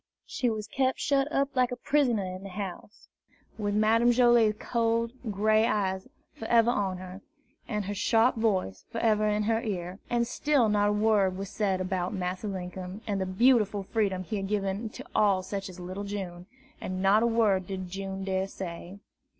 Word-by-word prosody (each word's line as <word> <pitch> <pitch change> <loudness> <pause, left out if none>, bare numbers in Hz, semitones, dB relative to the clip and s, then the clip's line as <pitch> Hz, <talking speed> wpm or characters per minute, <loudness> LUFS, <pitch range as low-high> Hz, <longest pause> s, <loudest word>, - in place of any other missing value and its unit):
She 245 - -1
was 215 -2 -3
kept 260 +3 0
shut 280 +1 +1
up 275 -1 0
like 250 -1 +2
a - - -2
prisoner 245 -5 +1
in 185 0 -6
the 195 - -8
house, 200 +1 -7 0.5
with 205 -1 -1
Madame 225 +3 +4
Joilet's 240 -3 +4
cold 230 -1 0 0.2
gray 215 +2 +3
eyes 190 -4 -1 0.3
forever 230 +1 +3
on 195 -5 -1
her, 185 +1 -9 0.5
and 210 -3 -2
her 205 - -3
sharp 225 +4 +3
voice 190 - 0
forever 215 -2 +1
in 210 0 +1
her 225 +1 +1
ear. 185 -3 -4
And 240 -1 +1
still 255 -1 +2
not 205 0 +3
a - - +2
word 210 -3 +2
was 195 0 -5
said 195 -3 0
about 185 +1 -2
Massa 185 +2 -3
Linkum 185 +1 -6
and 200 -2 -1
the 190 - -1
beautiful 210 0 +3
freedom 195 -3 -1
he 215 +3 -4
had 195 -1 -3
given 200 +1 -2
to - - -10
all 195 -3 +3
such 195 0 -5
as 185 0 -11
little 185 +3 -5
June, 190 -3 -6 0.3
and 185 0 -4
not 200 +3 +5
a 235 - +3
word 210 -6 +2
did 185 -1 -5
June 195 +1 -5
dare 190 0 -1
to - - -16
say. 180 +1 -7
205 Hz, 185 wpm, -28 LUFS, 190-225 Hz, 0.5 s, not